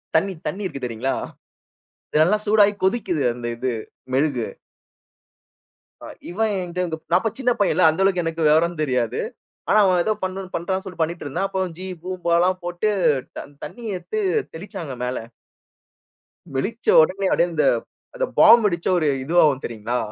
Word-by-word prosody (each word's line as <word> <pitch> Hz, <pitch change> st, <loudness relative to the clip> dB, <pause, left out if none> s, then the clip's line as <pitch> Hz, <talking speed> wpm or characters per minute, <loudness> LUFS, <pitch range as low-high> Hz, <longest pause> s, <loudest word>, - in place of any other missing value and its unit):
தண்ணீ, 195 Hz, 0 st, +2 dB
தண்ணீ 205 Hz, +3 st, -3 dB
இருக்கு, 140 Hz, -8 st, -4 dB
தெரியுங்களா? 120 Hz, +3 st, -2 dB, 1.0 s
இதெல்லாம் 180 Hz, +8 st, +3 dB
சூடாயி 205 Hz, -1 st, +5 dB
கொதிக்கிது 190 Hz, -7 st, 0 dB
அந்த 120 Hz, -1 st, -6 dB
இது, 130 Hz, +1 st, -1 dB, 0.4 s
மெழுகு. 135 Hz, -4 st, +1 dB, 1.6 s
அ -, -, -9 dB, 0.2 s
இவன் 215 Hz, +5 st, 0 dB
என்கிட்ட, 175 Hz, -2 st, -3 dB
நான் 175 Hz, -, +5 dB
இப்போ 225 Hz, -2 st, -1 dB
சின்ன 250 Hz, -2 st, +2 dB
பையன் 200 Hz, -, +3 dB
இல்ல 185 Hz, -, +3 dB
அந்த 160 Hz, +4 st, -1 dB
அளவுக்கு 185 Hz, -2 st, +2 dB
எனக்கு 165 Hz, -1 st, -1 dB
விவரம் 160 Hz, +2 st, +3 dB
தெரியாது. 125 Hz, -5 st, 0 dB, 0.5 s
ஆனா 215 Hz, -, +5 dB
அவன் 180 Hz, -2 st, +3 dB
ஏதோ 215 Hz, -, +1 dB
பண்றான்னு 190 Hz, 0 st, -3 dB
சொல்லி 185 Hz, -3 st, -9 dB
பண்ணிட்டு 165 Hz, +2 st, -2 dB
இருந்தான். 145 Hz, +8 st, -1 dB
அப்ப 190 Hz, -, -3 dB, 0.2 s
ஜீ 185 Hz, -, -6 dB, 0.2 s
பூம்பா 180 Hz, -2 st, -2 dB
எல்லாம் 185 Hz, +1 st, +2 dB
போட்டு 175 Hz, +4 st, -1 dB, 0.5 s
தண் 145 Hz, -, -9 dB
தண்ணி 240 Hz, -1 st, -10 dB
எடுத்து 435 Hz, -, -4 dB, 0.3 s
தெளிச்சாங்க 170 Hz, -, -7 dB
மேல. 125 Hz, +1 st, -2 dB, 1.4 s
வெளிச்ச 220 Hz, -, -3 dB, 0.2 s
உடனே 190 Hz, +5 st, 0 dB
அப்படியே 175 Hz, -, +2 dB
அந்த, 155 Hz, -, +2 dB, 0.5 s
அந்த -, -, 0 dB
பாம் 230 Hz, +1 st, +8 dB
வெடிச்ச 170 Hz, -4 st, 0 dB
ஒரு 155 Hz, -3 st, +1 dB, 0.2 s
இதுவாகும் 150 Hz, -3 st, +3 dB
தெரியுங்களா? 115 Hz, +1 st, -3 dB
175 Hz, 150 wpm, -22 LUFS, 150-195 Hz, 1.6 s, பாம்